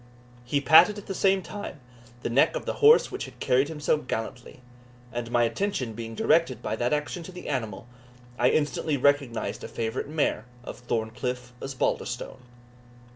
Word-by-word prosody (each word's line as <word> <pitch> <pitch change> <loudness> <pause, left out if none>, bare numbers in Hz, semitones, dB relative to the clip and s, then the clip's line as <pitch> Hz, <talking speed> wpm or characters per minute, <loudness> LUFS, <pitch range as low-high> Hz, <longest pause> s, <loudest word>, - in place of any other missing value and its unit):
He 130 +4 0
patted 160 +9 +7
at 205 - -9
the 195 - -4
same 195 0 +2
time 205 -7 -7 0.4
the - - -1
neck 130 +4 +4
of - - -4
the - - -1
horse 445 +2 +7
which - - -4
had - - -13
carried 130 +2 +2
him 160 -1 -7
so 150 - +2
gallantly; 120 -1 -6 0.5
and 120 -1 -4
my 120 0 +3
attention 130 - -1
being 115 0 -7
directed 145 -3 +2
by 110 - -1
that 120 +1 0
action 150 +4 -1
to 170 - -9
the 180 0 -9
animal, 115 -7 -3 0.5
I 120 +1 +5
instantly 150 0 0
recognised 140 -3 +1
a - - -5
favourite 115 +4 -3
mare 150 -7 0 0.2
of - - -8
Thorncliff 120 +1 -3
Osbaldistone. 135 -2 -3
130 Hz, 170 wpm, -27 LUFS, 120-155 Hz, 0.5 s, patted